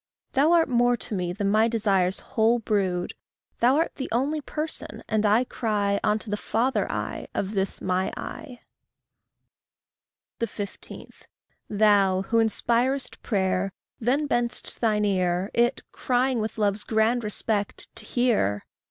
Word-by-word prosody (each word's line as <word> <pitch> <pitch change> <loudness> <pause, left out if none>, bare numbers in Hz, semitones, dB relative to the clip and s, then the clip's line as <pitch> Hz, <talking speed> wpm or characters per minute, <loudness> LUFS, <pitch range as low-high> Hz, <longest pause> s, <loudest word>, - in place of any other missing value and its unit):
Thou 285 +4 +4
art 335 -1 +4
more 245 -1 +3
to 220 - -5
me 180 -3 -1
than 200 +2 -1
my 220 +2 +4
desires' 195 -5 +1
whole 225 +2 +4
brood; 195 -6 -1 0.5
Thou 250 +3 +4
art 325 +3 +1
the 265 - -4
only 280 +6 0
person, 305 +2 -5
and 215 0 +1
I 215 +4 +4
cry 205 -5 0
Unto 215 0 0
the 210 - 0
father 240 +5 0
I - - -4
of 195 - -1
this 195 -2 -2
my 185 +1 0
I. 250 -5 -8 1.8
15. 210 -3 -6 0.6
Thou 200 -3 +3
who 230 +3 +1
inspirest 240 +4 0
prayer, 190 -2 0 0.3
then 265 +6 +1
bend'st 240 -3 -2
thine 210 -2 +2
ear; 185 0 0
It, 240 +2 +2
crying 250 0 +1
with 220 0 -3
love's 205 -1 0
grand 225 +2 +1
respect 210 0 -2
to - - -5
hear! 215 - +1
220 Hz, 135 wpm, -25 LUFS, 200-245 Hz, 1.8 s, Thou